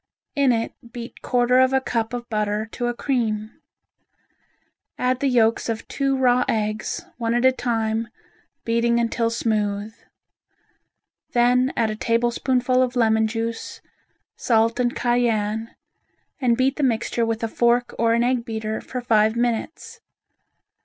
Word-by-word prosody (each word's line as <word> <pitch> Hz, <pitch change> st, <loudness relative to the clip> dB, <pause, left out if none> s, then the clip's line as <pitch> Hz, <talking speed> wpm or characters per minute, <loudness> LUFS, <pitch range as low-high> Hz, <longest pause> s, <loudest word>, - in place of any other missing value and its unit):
In 280 Hz, -3 st, +3 dB
it 230 Hz, -1 st, -1 dB, 0.2 s
beat 235 Hz, 0 st, -9 dB
quarter 250 Hz, 0 st, +2 dB
of 260 Hz, 0 st, +4 dB
a 265 Hz, -, +4 dB
cup 230 Hz, -4 st, -2 dB
of 240 Hz, -1 st, -5 dB
butter 215 Hz, -1 st, -1 dB
to 245 Hz, -, -3 dB
a 240 Hz, -, -1 dB
cream. 220 Hz, -5 st, -2 dB, 1.4 s
Add 250 Hz, 0 st, 0 dB
the 280 Hz, -, +1 dB
yolks 230 Hz, -3 st, +2 dB
of 225 Hz, 0 st, -4 dB
two 275 Hz, -1 st, 0 dB
raw 250 Hz, -1 st, +3 dB
eggs, 215 Hz, +10 st, -2 dB
one 230 Hz, 0 st, 0 dB
at 240 Hz, +1 st, +2 dB
a 260 Hz, -, +7 dB
time, 225 Hz, -3 st, -1 dB, 0.6 s
beating 235 Hz, +1 st, +2 dB
until 230 Hz, 0 st, 0 dB
smooth. 215 Hz, -2 st, -1 dB, 1.4 s
Then 250 Hz, +2 st, +3 dB
add 225 Hz, -2 st, +1 dB
a -, -, -4 dB
tablespoonful 245 Hz, +3 st, +1 dB
of 255 Hz, 0 st, 0 dB
lemon 220 Hz, -2 st, +3 dB
juice, 230 Hz, +1 st, -4 dB, 0.6 s
salt 230 Hz, 0 st, +1 dB
and 240 Hz, -1 st, 0 dB
cayenne, 225 Hz, -2 st, 0 dB, 0.6 s
and 240 Hz, -4 st, +2 dB
beat 260 Hz, +1 st, +1 dB
the -, -, -2 dB
mixture 235 Hz, -2 st, 0 dB
with 225 Hz, 0 st, -2 dB
a -, -, +1 dB
fork 240 Hz, +2 st, +1 dB
or 230 Hz, 0 st, +3 dB
an 235 Hz, -, +2 dB
egg 245 Hz, -1 st, +1 dB
beater, 220 Hz, -2 st, -4 dB
for 250 Hz, -, -6 dB
five 220 Hz, -2 st, +3 dB
minutes. 245 Hz, -, -3 dB
235 Hz, 145 wpm, -23 LUFS, 225-250 Hz, 1.4 s, a